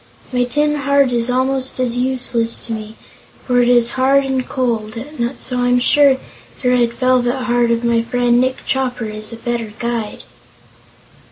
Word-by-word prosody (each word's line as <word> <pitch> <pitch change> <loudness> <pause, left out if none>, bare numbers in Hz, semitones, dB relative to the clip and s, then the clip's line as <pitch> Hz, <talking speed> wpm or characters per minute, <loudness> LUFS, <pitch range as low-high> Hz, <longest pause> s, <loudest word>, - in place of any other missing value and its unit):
My 250 0 +2
tin 295 +4 0
heart 280 -2 +2
is 235 0 -1
almost 260 +1 -1
as 245 -2 +1
useless 245 -2 0
to 230 - -4
me, 215 0 -7 0.5
for 245 -1 +3
it 240 - +2
is 240 -1 +4
hard 270 +2 +3
and 265 -1 -2
cold, 230 -4 -2 0.5
so 250 -1 -3
I'm 245 0 +2
sure 275 +1 +4 0.5
the 250 - +2
red 240 -2 +2
velvet 255 0 +1
heart 240 -1 +1
of 235 0 0
my 235 -1 +2
friend 245 +1 +1
Nick 260 0 -2
Chopper 255 -3 -1
is 215 0 -5
a - - -6
better 230 -2 -4
guide." 235 -3 -4
245 Hz, 165 wpm, -17 LUFS, 235-260 Hz, 0.5 s, is